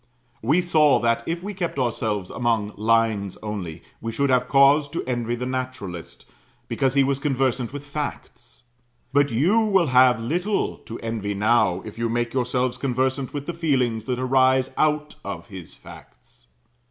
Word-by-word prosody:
We 150 +11 +3
saw 155 -5 +4
that, 115 0 +2
if 170 +1 -3
we 205 +1 -4
kept 180 -6 -3
ourselves 110 -6 -1
among 115 -4 -1
lines 110 -3 +1
only, 90 -7 -5 0.2
we 115 - -3
should 140 +3 0
have 125 0 +2
cause 140 +2 +5
to - - -4
envy 120 -2 -2
the 125 +1 -4
naturalist, 125 -9 -5 0.4
because 135 -1 0
he 140 - +5
was 135 0 0
conversant 130 -4 0
with 145 +1 -7
facts; 140 -4 -7 0.5
but 145 0 +4
you 160 - +3
will 200 -5 +3
have 125 -2 +6
little 175 - -1
to 115 - -6
envy 110 -3 -3
now, 100 -3 +2
if 110 +1 -9
you 115 0 0
make 120 0 -1
yourselves 125 0 -1
conversant 130 0 -1
with 145 -1 -5
the 175 - -4
feelings 130 -9 0
that 125 -1 -1
arise 130 0 +2
out 150 -1 0
of - - -7
his 95 -5 -10
facts. - - -16
125 Hz, 165 wpm, -23 LUFS, 115-140 Hz, 0.5 s, have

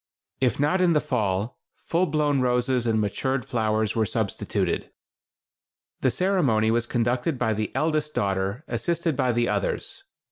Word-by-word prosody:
If 130 -1 +1
not 150 +6 +2
in 175 -2 +4
the 150 - +4
fall, 110 -7 -1 0.2
full 175 +2 +1
blown 150 -2 +1
roses 125 0 +1
and 110 -1 +2
matured 130 +5 -1
flowers 110 -2 0
were 110 -2 +1
substituted. - - -1 1.1
The 130 - +2
ceremony 130 - +2
was 120 +1 +1
conducted 125 +5 0
by 110 -2 +1
the 105 0 -2
eldest 155 -1 0
daughter, 100 +5 -1
assisted 170 -3 -1
by 125 -1 +1
the 120 0 +1
others. 105 -2 -2
125 Hz, 145 wpm, -25 LUFS, 110-150 Hz, 1.1 s, in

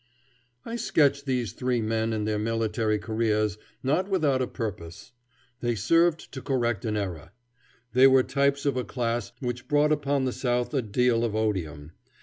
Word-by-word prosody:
I 230 +1 -4
sketch 140 - +2
these 125 -7 -1
three 125 -1 -1
men 110 0 0
and 110 -1 -2
their 105 -1 0
military 110 0 0
careers 110 -1 0 0.2
not 155 +9 +1
without 150 -9 +2
a 125 - 0
purpose. 100 -1 -6 0.5
They 120 -1 -1
serve 165 - +3
to 130 - -7
correct 120 -6 -1
an 105 -1 -1
error. 90 -4 -5 0.6
They 130 +2 +7
were 130 -1 +5
types 140 +1 0
of 140 - +1
a 125 - -1
class 120 0 -2
which 120 -1 -4
brought 150 +1 +3
upon 140 -2 +1
the 130 - -1
South 125 0 -1
a 135 - +2
deal 115 +2 +1
of 110 -3 -1
odium. 85 -9 -2
120 Hz, 165 wpm, -26 LUFS, 110-135 Hz, 0.6 s, They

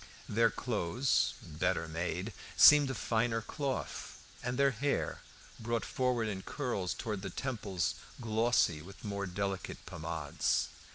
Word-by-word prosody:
Their 115 +2 +4
clothes, 120 +2 +1
better 80 +2 -1
made, 90 +5 -3 0.2
seemed 145 -2 +9
of 130 - -3
finer 115 0 +1
cloth, 135 +4 -4 0.2
and 125 0 -2
their 140 0 +5
hair, 140 +4 -1 0.4
brought 115 0 -1
forward 125 -3 0
in 100 -3 -3
curls 120 -8 -2
towards 105 -4 -3
the 95 - -4
temples, 100 - -2 0.3
glossy 110 -8 +2
with 95 +6 -12
more 100 -1 -2
delicate 95 +1 -3
pomades. 80 -2 -1
110 Hz, 125 wpm, -33 LUFS, 90-125 Hz, 0.4 s, seemed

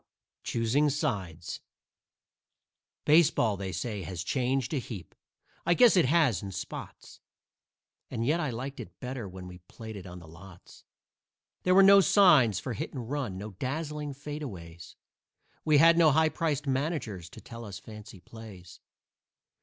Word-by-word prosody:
"CHOOSING 120 +6 +1
SIDES" 100 - -3 1.4
Baseball, 150 -9 +4
they 95 -1 -5
say, 105 +1 -4
has 90 -1 -5
changed 130 +4 -1
a 145 - +1
heap; 105 -9 -9 0.5
I 175 +1 +2
guess 245 0 +6
it 180 - +4
has, 140 - +2
in 100 - -6
spots, - - -8 0.9
And 115 - -3
yet 155 +6 +2
I 150 -4 -1
liked 130 +4 -6
it - - -10
better 125 -5 -6
when 90 0 -9
we 90 0 -11
played 110 +5 -10
it 95 -2 -9
on 90 0 -9
the 85 -2 -12
lots. 85 +2 -15 0.8
There 185 0 +2
were 195 - +8
no 200 0 +8
signs 155 - +5
for 125 - -5
"hit - - -5
and 125 -1 -6
run," 135 -10 -3
no 105 +3 -7
dazzling 145 - -4
"fadeaways"; 110 - -8 0.7
We 155 -2 +4
had 165 +3 +6
no 165 -2 +6
high 160 +2 +3
priced 150 -4 -2
managers 130 - -2
to - - -12
tell 115 0 -10
us 100 -3 -8
fancy 105 -1 -12
plays. 100 -4 -12
125 Hz, 155 wpm, -29 LUFS, 95-150 Hz, 1.4 s, were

